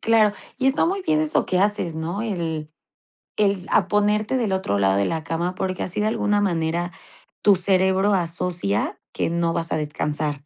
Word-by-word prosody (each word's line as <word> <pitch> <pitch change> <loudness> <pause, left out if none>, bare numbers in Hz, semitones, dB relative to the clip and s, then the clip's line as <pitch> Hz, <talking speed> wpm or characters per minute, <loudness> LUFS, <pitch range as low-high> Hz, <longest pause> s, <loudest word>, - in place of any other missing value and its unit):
Claro, 220 -2 +4 0.3
y 260 - +1
está 270 +4 +3
muy 385 +3 -1
bien 155 - +2
eso 155 -1 +1
que 185 - +1
haces, 195 -4 0
¿no?, 165 +6 -3
el 165 -8 -3 0.7
el 200 -3 +1
a 190 - +3
ponerte 210 +4 +1
del 225 -5 0
otro 190 - 0
lado 95 -1 +3
de 100 0 +2
la 160 -1 -2
cama, 170 +4 -2
porque 185 0 -3
así, 185 +3 -3
de 210 - +1
alguna 205 -1 +1
manera, 170 -2 0 0.5
tu 205 -1 +6
cerebro 190 +2 +3
asocia 170 - -1
que - - -1
no 170 0 0
vas 165 0 -2
a - - +1
descansar. 150 -1 -3
180 Hz, 185 wpm, -23 LUFS, 160-205 Hz, 0.7 s, tu